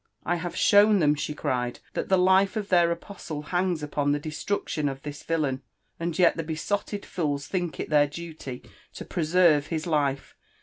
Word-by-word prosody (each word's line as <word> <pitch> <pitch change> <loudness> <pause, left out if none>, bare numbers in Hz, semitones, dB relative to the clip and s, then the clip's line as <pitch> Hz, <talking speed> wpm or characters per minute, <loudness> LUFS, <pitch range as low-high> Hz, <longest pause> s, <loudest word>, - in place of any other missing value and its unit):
' - - -53
' - - -38
I - - 0
have 170 0 -5
shown 205 0 +5
tbem," 150 -3 +3
she 150 +1 -4
cried, 125 -4 -2
"that - - -3
the 190 - +4
Dfeof 190 +3 +3
their 175 -2 +4
apostle 170 -4 -6
hangs 175 -1 -1
opon 145 -1 0
the 145 - 0
destruction 155 0 -2
of 135 0 -7
this 145 -1 -7
tillaln, 145 -5 -1 0.4
and 170 -1 -2
yet 175 -2 +4
tbe 165 -2 -4
besotted 200 +5 -3
fools 145 -5 -2
think 175 -1 -3
it - - -4
Iheir 145 -1 +4
duty 155 -5 -8 0.3
to - - -7
preserve 165 -3 +3
his 160 -2 -3
life. 145 -5 -1
160 Hz, 185 wpm, -26 LUFS, 145-180 Hz, 0.4 s, shown